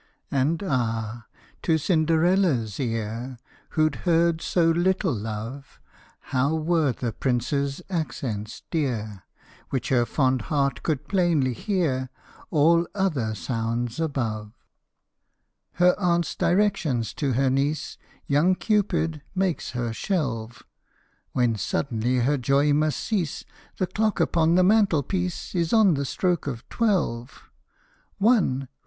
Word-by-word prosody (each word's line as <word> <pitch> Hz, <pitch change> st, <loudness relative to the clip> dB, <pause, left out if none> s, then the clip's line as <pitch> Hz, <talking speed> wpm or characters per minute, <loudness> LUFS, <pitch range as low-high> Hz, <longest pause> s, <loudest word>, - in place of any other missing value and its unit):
And, 145 Hz, +7 st, +1 dB
ah! 115 Hz, -, -2 dB, 0.3 s
to 160 Hz, -2 st, +2 dB
Cinderella's 160 Hz, -, +2 dB
ear, 115 Hz, +1 st, -3 dB, 0.4 s
Who 155 Hz, 0 st, +5 dB
'd -, -, -9 dB
heard 170 Hz, -1 st, +2 dB
so 165 Hz, -2 st, +2 dB
little 180 Hz, 0 st, +1 dB
love, 115 Hz, +5 st, -6 dB, 0.5 s
How 135 Hz, +4 st, +2 dB
were 160 Hz, -2 st, +1 dB
the 120 Hz, 0 st, -3 dB
Prince's 135 Hz, +6 st, -1 dB
accents 120 Hz, -, -4 dB
dear, 110 Hz, -, -2 dB, 0.4 s
Which 130 Hz, -4 st, -2 dB
her 120 Hz, -3 st, +2 dB
fond 130 Hz, +1 st, +1 dB
heart 140 Hz, -4 st, 0 dB
could 150 Hz, -2 st, -2 dB
plainly 170 Hz, -9 st, +2 dB
hear 130 Hz, -, -1 dB, 0.4 s
All 170 Hz, +2 st, +4 dB
other 145 Hz, -, 0 dB
sounds 115 Hz, +2 st, -3 dB
above! 115 Hz, -9 st, -2 dB, 1.2 s
Her 180 Hz, 0 st, +4 dB
aunt's 170 Hz, -2 st, +1 dB
directions 175 Hz, -, +1 dB
to 140 Hz, -4 st, -1 dB
her 130 Hz, +2 st, +2 dB
niece 145 Hz, +3 st, -1 dB, 0.3 s
Young 155 Hz, +6 st, +3 dB
Cupid 180 Hz, -7 st, 0 dB
makes 185 Hz, -3 st, 0 dB
her 120 Hz, -2 st, -2 dB
shelve; 120 Hz, -, -3 dB, 0.7 s
When 120 Hz, -2 st, +2 dB
suddenly 120 Hz, +3 st, -1 dB
her 140 Hz, +3 st, +1 dB
joy 140 Hz, +3 st, +3 dB
must 155 Hz, +1 st, +1 dB
cease 185 Hz, -9 st, -2 dB, 0.3 s
The 185 Hz, -, +1 dB
clock 215 Hz, +3 st, -1 dB
upon 165 Hz, 0 st, +3 dB
the 185 Hz, -, +5 dB
mantelpiece 180 Hz, -, +1 dB
Is 170 Hz, -2 st, 0 dB
on 215 Hz, -5 st, +5 dB
the 140 Hz, -1 st, -1 dB
stroke 175 Hz, +2 st, -1 dB
of 120 Hz, -5 st, -5 dB
twelve. 165 Hz, -, -1 dB, 0.7 s
One 195 Hz, -, +2 dB
145 Hz, 120 wpm, -25 LUFS, 120-175 Hz, 1.2 s, Who